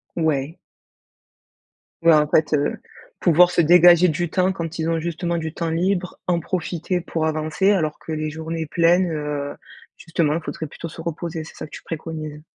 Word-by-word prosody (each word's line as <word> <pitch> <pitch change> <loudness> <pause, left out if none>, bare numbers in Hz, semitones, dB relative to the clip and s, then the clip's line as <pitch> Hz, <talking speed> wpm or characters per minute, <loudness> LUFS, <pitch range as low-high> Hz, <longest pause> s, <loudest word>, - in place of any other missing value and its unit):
Ouais. 155 -1 -1 1.4
Ouais 165 0 +6
en 150 -1 +4
fait, 155 0 +2
heu, 145 -1 +1 0.4
pouvoir 175 +1 +5
se - - 0
dégager 175 +1 +7
du 175 +1 -1
temps 185 +3 +1
quand 165 -3 -5
ils 160 0 0
ont 165 -1 0
justement 170 +1 -2
du 160 -1 -4
temps 170 -1 -3
libre, 180 +2 -1
en 175 -2 +2
profiter 175 +1 -2
pour 165 -2 -2
avancer 155 +5 +1
alors 155 -7 0
que 160 - -6
les 155 0 -2
journées 160 +1 -5
pleines, 170 +2 +3
heu, 150 -2 -3 0.4
justement 165 -2 0
il 170 - -2
faudrait 155 +1 -5
plutôt 165 +3 -8
se 165 - -9
reposer, 165 0 -4
c'est 155 - -13
ça - - -7
que 155 - -16
tu - - -10
préconises? 155 -2 -6
165 Hz, 180 wpm, -22 LUFS, 155-175 Hz, 1.4 s, dégager